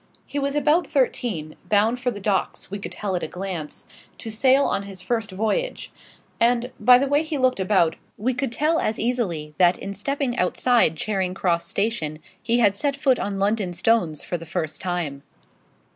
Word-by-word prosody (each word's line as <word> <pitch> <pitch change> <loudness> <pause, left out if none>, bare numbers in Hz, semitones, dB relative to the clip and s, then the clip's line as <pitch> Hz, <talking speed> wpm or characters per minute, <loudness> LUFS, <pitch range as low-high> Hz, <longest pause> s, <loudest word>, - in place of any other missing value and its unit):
He 290 - -3
was 280 0 -1
about 300 +4 +3
thirteen; 235 - -1
bound 215 +4 +3
for 250 0 0
the 210 -4 -5
docks, 195 -2 -1
we 200 - -4
could 200 - -6
tell 200 -3 -3
at 175 - -1
a - - -3
glance, 180 -5 -6 0.3
to 225 - -6
sail 265 +5 +4
on - - 0
his 195 -2 -8
first 225 -2 -1
voyage; 220 - -2 0.5
and, 240 +1 +2
by 250 0 +7
the 270 - +1
way 285 +2 +2
he 315 -1 -3
looked 255 -4 +2
about, 185 -4 +2 0.2
we 250 +5 0
could 260 0 -2
tell 310 +6 +1
as 215 - 0
easily 185 -11 -2
that 180 0 +5
in 200 - -6
stepping 265 +5 -2
outside 205 -1 +3
Charing 190 -1 -1
Cross 170 -3 0
Station 200 -9 -1 0.2
he 235 +1 +2
had 205 -5 +4
set 280 +3 -1
foot 265 -3 +2
on 200 -1 -2
London 200 -2 0
stones 175 -5 +1
for 175 - -3
the 165 - -10
first 160 -3 -3
time. 175 -7 -3
210 Hz, 190 wpm, -23 LUFS, 180-250 Hz, 0.5 s, by